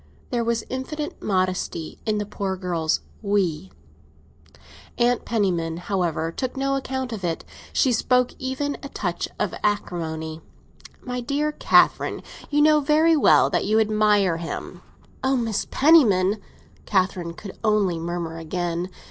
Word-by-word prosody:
There 240 -1 +1
was 230 -1 0
infinite, 295 +4 -5
modesty 185 -4 -1
in 215 -1 +1
the 210 - -2
poor 195 -2 -3
girl's 170 -4 -1 0.2
"we." 190 -5 0 1.3
Aunt 240 0 +2
Penniman, 175 -7 0
however, 175 -3 -1
took 255 +8 -4
no 275 0 +1
account 265 -2 -3
of 205 -4 -6
it; 165 -2 -2 0.3
she 265 - +3
spoke 250 +2 +2
even 265 +2 -2
with 285 - -7
a - - -6
touch - - -3
of - - -1
acrimony. 160 -6 -2 0.6
"My 250 0 -3
dear 290 +4 0
Catherine, - - +3 0.3
you 295 0 +3
know 305 0 +6
very 310 +3 +4
well 295 - +5
that - - +1
you 215 +2 +3
admire 210 -4 +3
him!" 165 0 -6 0.4
"Oh, 265 0 +2
Aunt 220 -3 -2
Penniman!" 215 - +5 0.5
Catherine 185 -3 0
could 195 +1 -10
only 205 -6 +2
murmur 165 -1 -4
again. 175 +2 -3
205 Hz, 140 wpm, -24 LUFS, 175-260 Hz, 1.3 s, know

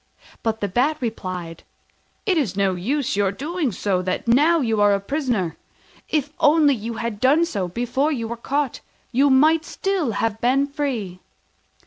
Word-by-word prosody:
But 225 0 -2
the 205 - 0
Bat 255 +10 +1
replied, 185 -8 -5 0.6
"It 385 -4 +2
is 245 - -1
no 195 -1 +2
use 265 +9 -1
your 200 -2 +1
doing 300 - -2
that 185 -3 -1
now 295 +8 +4
when 275 -7 0
you 220 -2 +1
are 205 -1 +5
a - - -1
prisoner: 220 - -2 0.5
if 295 -2 0
only 295 -1 +5
you 230 -1 -5
had 225 -2 -4
done 285 +8 +4
so 200 - -3
before 245 - -1
you 235 -6 -2
were 235 - -4
caught, 275 +3 -2 0.3
you 275 +4 +3
might 310 +4 +4
still 355 - -2
have 220 +1 -2
been 265 +3 +3
free." 265 - -3
245 Hz, 165 wpm, -22 LUFS, 205-290 Hz, 0.6 s, are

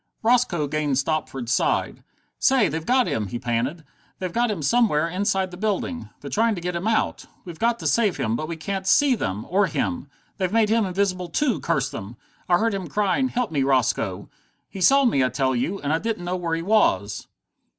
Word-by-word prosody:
Roscoe 225 -9 +2
gained 145 -2 -1
Stopford's 135 -4 -1
side. - - 0 0.4
"Say 260 -7 +4
they've 160 +2 -3
got 255 0 +4
him!" 105 -2 -2
he 120 - -4
panted. 125 +7 -2 0.3
"They've 185 -2 -4
got 240 0 +1
him 190 -8 -3
somewhere 165 - +2
inside 190 +1 -1
the 180 - -9
building. 215 +5 -2
They're - - -8
trying 225 0 +2
to 175 - -6
get 180 0 -3
him 175 +5 -2
out! 225 -1 0 0.2
We've 170 -3 -9
got 235 0 +2
to - - -9
save 215 -6 +2
him 110 0 -1
but 155 +6 -3
we 165 0 -5
can't 190 +3 -4
see 285 +5 +5
them 105 - -3
or 195 +2 +2
him. 255 - -2 0.3
They've 185 -1 0
made 220 -1 +3
him 225 -1 +3
invisible 185 -1 -1
too, 255 - 0
curse 135 -6 -1
them! 100 +5 -8 0.3
I 175 - +5
heard 225 +2 +1
him 190 -3 -4
crying, 210 - +1
'Help 250 -5 -2
me, 145 -3 0
Roscoe!' 125 -8 0 0.4
He 195 - -7
saw 275 +9 +5
me, 140 - +3
I 130 - +2
tell 130 -1 0
you 175 +11 -1
and 145 +1 -1
I 160 - +1
didn't 220 -4 -3
know 180 +1 -1
where 170 -2 -2
he 165 - -4
was!" 105 - +1
180 Hz, 210 wpm, -23 LUFS, 145-220 Hz, 0.4 s, see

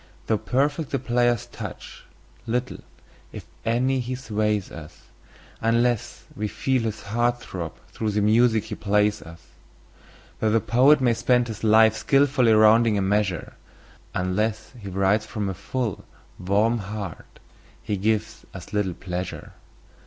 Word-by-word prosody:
Though 110 -2 +1
perfect 145 +3 0
the 135 - 0
player's 120 -2 +1
touch, - - -9 0.4
little, 125 +2 -2 0.5
if - - -9 0.2
any, 130 +3 +1
he 125 +1 -3
sways 105 -5 -1
us, 75 -2 -11 0.6
Unless 115 0 0
we 105 +1 -2
feel 130 +4 0
his 110 -1 -4
heart 120 +4 0
throb 85 -8 -6
through 110 - -3
the 105 0 0
music 110 +1 +3
he - - -7
plays 105 -2 +1
us. 80 +2 -13 0.9
Though 110 - +1
the 115 +1 +3
poet 130 +7 +4
may 120 -2 +3
spend 120 +1 +1
his 110 -1 -7
life 110 0 +6
in - - -6
skilfully 135 -4 +3
rounding 110 0 +5
a - - +1
measure, 95 -2 -1 0.6
Unless 105 +4 -1
he 100 -3 -7
writes 95 +3 +1
from 105 -2 -3
a - - -3
full, 115 +3 -4 0.4
warm 105 +6 +1
heart 100 -3 -7 0.5
he 110 -3 -2
gives 110 +2 -1
us 90 +1 -10
little 100 -4 0
pleasure. 90 0 -6
110 Hz, 145 wpm, -24 LUFS, 100-120 Hz, 0.9 s, life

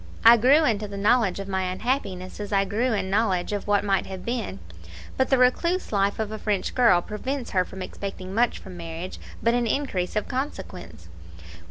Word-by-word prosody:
I 230 +1 +10
grew 270 +7 +5
into 215 -4 0
the 200 0 -7
knowledge 210 -2 +2
of 195 - -5
my 190 -1 -1
unhappiness 190 -4 -3
as 205 0 -5
I 195 -1 +3
grew 225 +6 0
in 195 -3 -1
knowledge 200 -3 +1
of 205 - -3
what 205 -1 +3
might 195 -2 +1
have 190 -1 -7
been; 230 - -3 0.6
but 260 - +1
the 265 - +4
recluse 340 +9 +2
life 200 -1 +1
of 220 -1 -3
a 215 - -5
French 205 -3 -1
girl 230 -9 +4
prevents 255 +5 -4
her 185 -2 +2
from 190 +1 -8
expecting 190 0 -6
much 235 +3 +2
from 185 -2 -11
marriage 170 +1 -7 0.2
but 230 - +3
an 240 -1 +1
increase 220 -9 -1
of 210 - -1
consequence. 250 - -6
205 Hz, 195 wpm, -25 LUFS, 190-240 Hz, 0.6 s, I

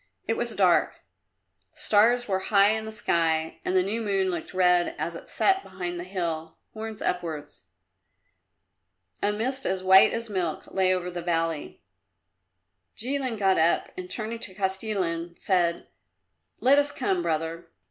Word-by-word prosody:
It - - +1
was - - -2
dark; - - +2 0.7
the - - -25
stars 245 -3 +3
were 190 -2 0
high 200 +1 +4
in 220 0 -2
the 220 - -6
sky 165 -6 0
and 185 - -1
the 185 - +4
new 215 +5 -2
moon 195 -3 0
looked 170 -2 -5
red 180 -1 +3
as - - -3
it - - -10
set 385 0 +2
behind 180 - -5
the - - -4
hill, 165 -4 -4 0.2
horns 220 -1 -6
upwards. 160 - -4 1.6
A 205 - +2
mist 260 +6 -2
as 185 0 -2
white 190 +1 +7
as 230 0 -3
milk 180 -6 -2
lay 190 -1 +3
over 180 -1 -1
the 175 0 -5
valley. 165 -2 -2 1.1
Jilin 255 -1 -2
got 195 -3 +3
up 165 +2 +2
and 180 0 -7
turning 225 +3 -3
to 190 -5 -6
Kostilin 190 -4 -2
said, 175 -3 0 0.8
"Let 275 +3 +5
us 290 0 +1
come, 190 -8 -1
brother." 165 0 -3
190 Hz, 155 wpm, -26 LUFS, 170-220 Hz, 1.6 s, white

